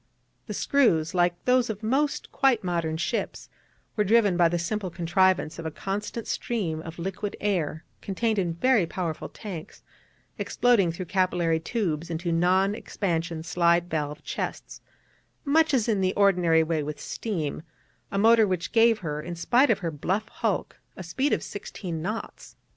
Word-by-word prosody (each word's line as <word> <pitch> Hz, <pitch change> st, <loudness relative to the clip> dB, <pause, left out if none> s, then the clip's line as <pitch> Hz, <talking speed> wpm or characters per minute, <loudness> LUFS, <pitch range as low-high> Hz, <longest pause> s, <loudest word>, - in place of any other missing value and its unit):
The -, -, -4 dB
screws, 170 Hz, -, +2 dB
like 175 Hz, -1 st, +1 dB
those 250 Hz, -1 st, +3 dB
of 220 Hz, 0 st, -5 dB
most 280 Hz, +6 st, 0 dB
quite 265 Hz, -6 st, +2 dB
modern 170 Hz, -3 st, -1 dB
ships, -, -, -3 dB, 0.5 s
were 210 Hz, -, +2 dB
driven 210 Hz, -2 st, +4 dB
by 175 Hz, -1 st, +4 dB
the 175 Hz, -, 0 dB
simple 190 Hz, +3 st, -2 dB
contrivance 175 Hz, -1 st, +1 dB
of 165 Hz, -, -6 dB
a -, -, -1 dB
constant 205 Hz, +7 st, -4 dB
stream 175 Hz, -10 st, -2 dB
of 165 Hz, 0 st, -9 dB
liquid 195 Hz, +3 st, -4 dB
air, 170 Hz, -6 st, -1 dB, 0.2 s
contained 215 Hz, +2 st, -1 dB
in 170 Hz, -3 st, -1 dB
very 220 Hz, -1 st, +3 dB
powerful 165 Hz, -3 st, -4 dB
tanks, 180 Hz, -7 st, -9 dB, 0.6 s
exploding 225 Hz, -8 st, +2 dB
through 180 Hz, +2 st, -6 dB
capillary 175 Hz, -3 st, +1 dB
tubes 170 Hz, -4 st, -2 dB
into 170 Hz, +1 st, -2 dB
non 185 Hz, +4 st, +3 dB
expansion 170 Hz, -6 st, -3 dB
slide 170 Hz, +1 st, +2 dB
valve 150 Hz, -1 st, -3 dB
chests, -, -, -5 dB, 0.6 s
much 315 Hz, +2 st, +3 dB
as 245 Hz, -5 st, +2 dB
in 210 Hz, -4 st, +1 dB
the 185 Hz, 0 st, +1 dB
ordinary 180 Hz, -5 st, +4 dB
way 160 Hz, -1 st, -1 dB
with 150 Hz, 0 st, -5 dB
steam: 165 Hz, -12 st, -3 dB, 0.5 s
a 195 Hz, -, -2 dB
motor 225 Hz, +1 st, +5 dB
which 185 Hz, -2 st, -2 dB
gave 230 Hz, -1 st, +5 dB
her, 150 Hz, -1 st, -2 dB
in 175 Hz, +2 st, -6 dB
spite 245 Hz, +11 st, +3 dB
of 225 Hz, -, +4 dB
her 165 Hz, -, -1 dB
bluff 190 Hz, +8 st, -2 dB
hulk, -, -, -2 dB, 0.2 s
a 185 Hz, -, -6 dB
speed 260 Hz, -, -1 dB
of -, -, +1 dB
sixteen 175 Hz, -5 st, -6 dB
knots. 215 Hz, +6 st, -6 dB
185 Hz, 160 wpm, -26 LUFS, 165-215 Hz, 0.6 s, motor